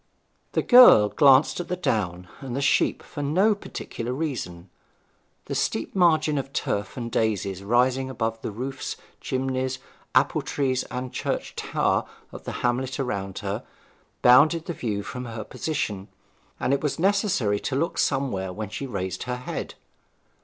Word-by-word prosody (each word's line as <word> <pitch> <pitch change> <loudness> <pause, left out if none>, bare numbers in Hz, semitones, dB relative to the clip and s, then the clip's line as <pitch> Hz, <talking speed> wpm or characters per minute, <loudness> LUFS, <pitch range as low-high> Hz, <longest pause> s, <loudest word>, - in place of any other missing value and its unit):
The - - +1
girl 245 - +8
glanced 140 +3 +5
at 175 - -4
the 180 - -1
down 90 - -1
and 130 -3 -6
the - - -1
sheep - - +2
for 145 - -7
no 185 +10 +3
particular 125 - -6
reason; 110 - -4 0.7
the - - -5
steep 115 - -1
margin 155 -5 +3
of 135 0 -6
turf 100 +2 -2
and 120 -1 -4
daisies 100 -4 -1
rising 125 +5 +2
above 115 -3 -3
the - - -3
roofs, 130 +5 -5 0.2
chimneys, 130 0 -2 0.4
apple 140 +4 +3
trees, 135 -2 -1
and 125 0 -5
church - - -3
tower - - 0 0.3
of - - -10
the - - -4
hamlet 130 +3 -1
around 100 -7 -3
her, - - -3 0.6
bounded 155 +7 +6
the 170 - -3
view 105 -8 -3
from 125 +4 -6
her 115 -2 -6
position, 105 -9 -3 0.5
and 130 - +1
it 140 - +1
was 150 - -1
necessary 185 - +1
to 130 - -3
look 165 +5 -1
somewhere 125 -10 0
when 105 +2 -5
she 135 +6 -5
raised 95 -5 -4
her 125 - -1
head. 125 - -5
130 Hz, 155 wpm, -25 LUFS, 105-140 Hz, 0.7 s, girl